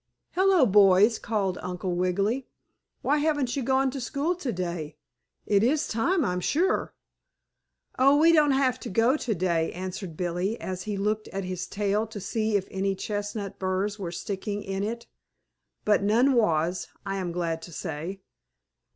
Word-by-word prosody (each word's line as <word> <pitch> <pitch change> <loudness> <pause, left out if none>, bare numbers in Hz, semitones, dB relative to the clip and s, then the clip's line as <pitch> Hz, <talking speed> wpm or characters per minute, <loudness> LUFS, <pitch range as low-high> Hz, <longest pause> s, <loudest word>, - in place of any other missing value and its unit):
"Hello, 375 -5 +4
boys!" 205 +1 +5
called 200 -5 -1
Uncle 180 0 -3
Wiggily. 200 +8 0 0.6
"Why 295 - +2
haven't 290 -5 0
you 275 - -1
gone 265 +1 +2
to 270 0 -5
school 280 +8 -1
today? 175 - -4 0.5
It 200 -1 +3
is 285 +7 +2
time, 320 +9 +1
I'm 180 0 0
sure." 330 - 0 1.0
"Oh, 275 +2 +6
we 325 +3 +6
don't 305 -2 +5
have 265 -2 +2
to - - -6
go 230 +7 +3
today," 180 - 0
answered 185 -2 -6
Billie, 180 +5 -1
as 185 -1 -5
he 210 -2 -3
looked 215 +2 -1
at 195 0 -4
his 185 -1 -4
tail 205 +2 0
to 220 -1 -7
see 215 +2 -1
if 190 - -4
any 195 0 -1
chestnut 205 0 -4
burrs 190 +2 -1
were 180 -4 -4
sticking 200 +3 -4
in 195 0 -3
it. 235 +3 -4 0.8
But 210 -1 +4
none 235 +7 +3
was, 175 -6 +1 0.2
I 195 0 -2
am 180 -2 -3
glad 170 -2 -2
to 175 - -10
say. 170 +5 -5
205 Hz, 160 wpm, -27 LUFS, 185-245 Hz, 1.0 s, Oh